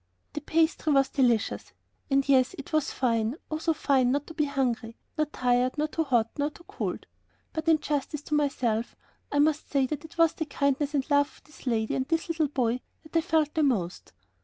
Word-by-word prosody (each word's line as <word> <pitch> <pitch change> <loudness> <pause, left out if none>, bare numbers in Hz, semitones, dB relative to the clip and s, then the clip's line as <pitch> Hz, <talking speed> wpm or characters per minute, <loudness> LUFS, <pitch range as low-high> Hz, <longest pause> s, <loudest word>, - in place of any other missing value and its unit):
The 300 - -4
pastry 320 0 +1
was 275 -1 +4
delicious, 240 -5 +1 0.4
and 275 0 +2
yes, 260 -2 +4
it 280 +3 -9
was 310 -2 +1
fine, 230 -1 0 0.2
oh, 310 - -1
so 325 - +1
fine 265 -4 +2
not 285 +2 0
to 325 - -10
be 305 -2 +1
hungry, 250 -5 -1 0.2
nor 305 -1 +1
tired, 250 -1 +1
nor 305 +1 +1
too 320 +1 -1
hot, 235 -4 +2
nor 290 +1 +1
too 340 - -16
cold, - - -4 0.5
but 315 0 -4
in 325 -1 +6
justice 300 -1 -3
to 300 - -5
myself, 255 -6 0 0.4
I 285 - 0
must 300 +1 +2
say 275 -2 +2
that 290 +3 -4
it 320 +1 -13
was 330 -1 +5
the 320 - -3
kindness 280 0 0
and 270 -2 0
love 285 0 +5
of - - -23
this 300 -2 -15
lady 220 -2 +1
and 260 0 -1
this 330 +2 -1
little 320 -2 +1
boy 250 -3 0 0.2
that 310 +1 -16
I 330 - +5
felt 315 -3 +1
the 315 - +1
most. 205 - 0
285 Hz, 210 wpm, -28 LUFS, 255-310 Hz, 0.5 s, in